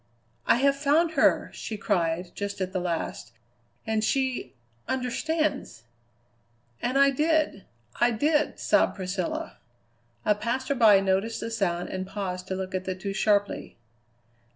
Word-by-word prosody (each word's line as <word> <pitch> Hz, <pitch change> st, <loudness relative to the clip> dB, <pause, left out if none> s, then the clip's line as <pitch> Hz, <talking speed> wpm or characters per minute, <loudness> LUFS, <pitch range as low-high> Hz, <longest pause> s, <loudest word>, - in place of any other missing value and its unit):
"'I -, -, +6 dB
have 275 Hz, +3 st, +3 dB
found 300 Hz, +4 st, +2 dB
her!' 285 Hz, -4 st, +3 dB
she 220 Hz, -, -5 dB
cried 175 Hz, -4 st, 0 dB
just 200 Hz, -1 st, -4 dB
at 185 Hz, -1 st, -3 dB
the 185 Hz, -, 0 dB
last, 175 Hz, -2 st, -3 dB, 0.5 s
'and 220 Hz, -1 st, 0 dB
she 260 Hz, -, -1 dB, 0.3 s
understands!'" 260 Hz, -, -1 dB, 1.0 s
"And 255 Hz, +3 st, 0 dB
I 275 Hz, 0 st, +6 dB
did, 305 Hz, -6 st, +1 dB, 0.3 s
I 240 Hz, -, +5 dB
did!" 295 Hz, +6 st, +1 dB
sobbed -, -, +2 dB
Priscilla. 185 Hz, -1 st, -4 dB, 0.7 s
A 210 Hz, -, +5 dB
passerby 230 Hz, -1 st, +3 dB
noticed 195 Hz, +4 st, 0 dB
the 230 Hz, -, -4 dB
sound 180 Hz, -6 st, -1 dB
and 185 Hz, 0 st, -4 dB
paused 185 Hz, -2 st, -4 dB
to 190 Hz, -, -2 dB
look 185 Hz, 0 st, -5 dB
at 185 Hz, 0 st, -2 dB
the 185 Hz, -, -2 dB
two 195 Hz, +1 st, -4 dB
sharply. 205 Hz, 0 st, 0 dB
210 Hz, 135 wpm, -27 LUFS, 185-265 Hz, 1.0 s, I